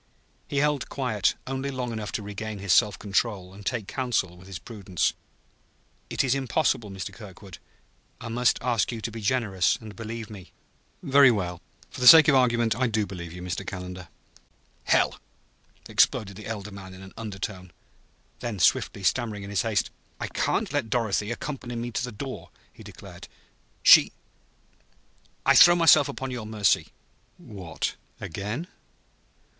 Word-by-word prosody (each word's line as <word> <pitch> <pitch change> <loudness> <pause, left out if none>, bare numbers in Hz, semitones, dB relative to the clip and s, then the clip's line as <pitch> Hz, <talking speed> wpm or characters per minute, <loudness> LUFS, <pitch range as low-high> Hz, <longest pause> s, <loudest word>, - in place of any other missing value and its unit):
He 140 - -4
held 145 -1 +1
quiet 110 -8 0
only 135 +1 -3
long 125 -3 -4
enough 110 -3 -5
to 105 - -3
regain 105 +1 -6
his 95 -2 +1
self 105 -4 +4
control 100 -2 -2
and 100 +1 -12
take 115 -1 -2
counsel 120 -9 -1
with 90 +1 -15
his 95 -2 -6
prudence. 95 -3 -2 1.0
"It - - 0
is 130 -2 +2
impossible, 135 -4 0
Mr. 95 -4 -6
Kirkwood. 100 -3 -12 0.6
I - - -7
must 120 +1 +2
ask 120 -3 +1
you 115 - -5
to 115 - -5
be 115 +1 -7
generous 105 -5 +1
and 110 -2 -11
believe 115 0 -6
me." 100 -4 -12 0.5
"Very 140 0 +6
well; 90 -6 -2 0.3
for - - -9
the 125 - +4
sake 160 0 +11
of 150 - +5
the 135 - +6
argument, 120 -3 +2
I 130 +3 +1
do 110 -2 0
believe 90 -3 -8
you, 90 +1 -9
Mr. 90 +1 -4
Calendar." 90 -2 -7 0.8
"Hell!" - - +2 0.7
exploded 100 -2 +2
the 105 +1 -9
elder 105 -2 -5
man 95 -1 -10
in 95 - -12
an 95 - -12
undertone. 95 -4 -6 0.7
Then 115 -4 -4
swiftly, 95 +3 +2
stammering 110 -1 0
in 100 - -8
his 100 - +1
haste: 110 -3 -1 0.3
"I - - -2
can't - - -1
let 115 - -1
Dorothy 105 -2 0
accompany 120 0 -5
me 120 +1 -4
to 120 - -2
the 125 - -4
door," 105 -7 -7 0.2
he - - -15
declared. - - -12 0.6
"She - - +8 1.3
I - - +5
I - - +7
throw 175 0 +9
myself 165 -4 +6
upon 135 -1 -5
your 120 -4 -5
mercy!" 110 -2 +2 0.5
"What 90 -6 -5 0.2
again?" 105 - -5
110 Hz, 165 wpm, -26 LUFS, 95-125 Hz, 1.3 s, sake